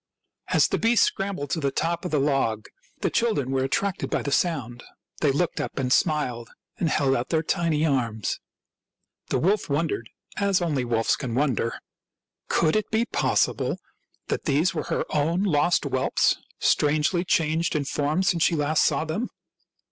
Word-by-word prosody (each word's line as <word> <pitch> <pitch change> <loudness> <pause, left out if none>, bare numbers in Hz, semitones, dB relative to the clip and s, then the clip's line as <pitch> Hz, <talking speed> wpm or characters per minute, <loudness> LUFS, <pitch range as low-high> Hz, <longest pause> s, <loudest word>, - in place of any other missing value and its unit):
As - - +3
the - - -1
beast 230 -1 +4
scrambled 195 -8 -2
to 165 - 0
the 140 -2 0
top 170 +5 -2
of - - -1
the 155 - +1
log 135 -6 0 0.4
the - - 0
children 180 - 0
were 135 -1 +1
attracted 185 +8 -1
by - - -1
the 140 - -3
sound; 135 -8 -1 0.4
they 145 - +3
looked 165 +5 -1
up - - -5
and 130 -2 +1
smiled 125 -8 0 0.3
and 165 - +1
held 135 -3 +2
out 120 0 -2
their 160 -1 +1
tiny 160 -2 +1
arms. 115 -8 -1 0.9
The - - +1
wolf 195 +1 +1
wondered, 140 -6 -1 0.3
as 200 -2 +2
only 155 -7 0
wolves 115 -1 +1
can 125 -5 -4
wonder. 125 -4 0 0.7
Could 160 +1 +2
it 215 - 0
be 225 +1 +1
possible - - 0 0.5
that - - -3
these 155 +4 +2
were 155 -3 -3
her - - -1
own 165 +6 +1
lost 170 -2 +2
whelps, 130 -2 +1 0.2
strangely 155 +4 +2
changed 165 -1 +1
in 145 -2 0
form 150 +6 0
since 175 -2 +1
she 165 - +3
last 150 +1 +2
saw 160 - +1
them 175 +11 -3
150 Hz, 170 wpm, -25 LUFS, 135-170 Hz, 0.9 s, beast